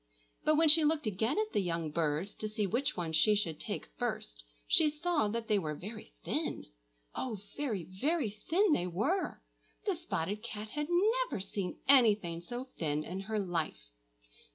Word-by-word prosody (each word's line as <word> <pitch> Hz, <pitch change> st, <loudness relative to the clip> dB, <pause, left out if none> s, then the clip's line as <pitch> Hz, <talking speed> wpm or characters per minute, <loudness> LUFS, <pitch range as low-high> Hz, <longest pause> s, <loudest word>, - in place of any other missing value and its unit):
But 310 Hz, -, +4 dB
when 325 Hz, +1 st, +5 dB
she 310 Hz, +1 st, +9 dB
looked 305 Hz, -1 st, +2 dB
again 220 Hz, +6 st, 0 dB
at 430 Hz, 0 st, 0 dB
the -, -, +2 dB
young 165 Hz, -4 st, -2 dB
birds, 160 Hz, +4 st, -1 dB
to 215 Hz, -, -3 dB
see 215 Hz, -1 st, -1 dB
which 240 Hz, +7 st, 0 dB
one 165 Hz, -2 st, -2 dB
she 185 Hz, +7 st, +5 dB
should 170 Hz, -7 st, -1 dB
take -, -, -4 dB
first, -, -, -3 dB, 0.2 s
she 310 Hz, -, +5 dB
saw 305 Hz, -5 st, 0 dB
that 225 Hz, +2 st, -3 dB
they 210 Hz, -1 st, +3 dB
were 155 Hz, -4 st, -3 dB
very 180 Hz, -, -9 dB
thin,—oh, -, -, -5 dB, 0.2 s
very, 230 Hz, -11 st, -2 dB
very 230 Hz, -, -1 dB
thin 330 Hz, -, +2 dB
they 180 Hz, -9 st, +1 dB
were! 220 Hz, -, -1 dB, 0.4 s
The 400 Hz, -, +2 dB
spotted 210 Hz, -, -3 dB
cat 215 Hz, 0 st, -6 dB
had 295 Hz, +5 st, -3 dB
never 435 Hz, -, +2 dB
seen 185 Hz, -1 st, -4 dB
anything 210 Hz, -11 st, +4 dB
so 240 Hz, +8 st, -5 dB, 0.2 s
thin 150 Hz, -2 st, 0 dB
in 180 Hz, +4 st, -5 dB
her 215 Hz, +3 st, -3 dB
life. 165 Hz, -, -3 dB
210 Hz, 170 wpm, -32 LUFS, -, 0.4 s, she